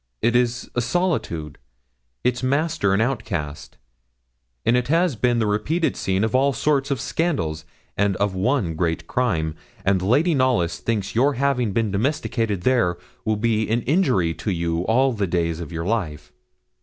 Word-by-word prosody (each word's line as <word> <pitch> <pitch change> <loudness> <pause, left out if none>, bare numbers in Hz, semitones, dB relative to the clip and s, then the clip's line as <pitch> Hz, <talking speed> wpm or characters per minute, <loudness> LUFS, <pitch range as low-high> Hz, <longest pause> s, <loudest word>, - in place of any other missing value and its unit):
It 120 +1 +3
is 120 0 +1
a 120 - 0
solitude 115 - -1 0.6
its 125 0 +1
master 140 -5 +1
an 105 - +2
outcast, 100 - -3 0.9
and 115 - +4
it 125 0 +1
has 165 0 +2
been 120 +2 +1
the 115 - +1
repeated 110 +12 0
scene 95 +1 0
of 110 - 0
all 135 +2 +3
sorts 140 0 +1
of 140 -3 -1
scandals, 100 - -1 0.3
and 100 -1 +1
of 100 0 0
one 95 - 0
great 85 0 -1
crime; 85 -10 0 0.3
and 95 -1 +2
Lady 145 - +3
Knollys 125 - +1
thinks 105 -4 -2
your 135 +5 +3
having 125 -4 +1
been 110 0 0
domesticated 115 - -1
there 90 -10 +2 0.3
will 110 - +1
be 110 0 0
an 115 +1 +1
injury 125 - +2
to 105 - -5
you 85 -3 -1
all 130 +3 +3
the 105 -3 -1
days 85 -2 -1
of 85 -1 -7
your 85 0 -4
life.' 80 -9 -3
110 Hz, 165 wpm, -23 LUFS, 90-130 Hz, 0.9 s, and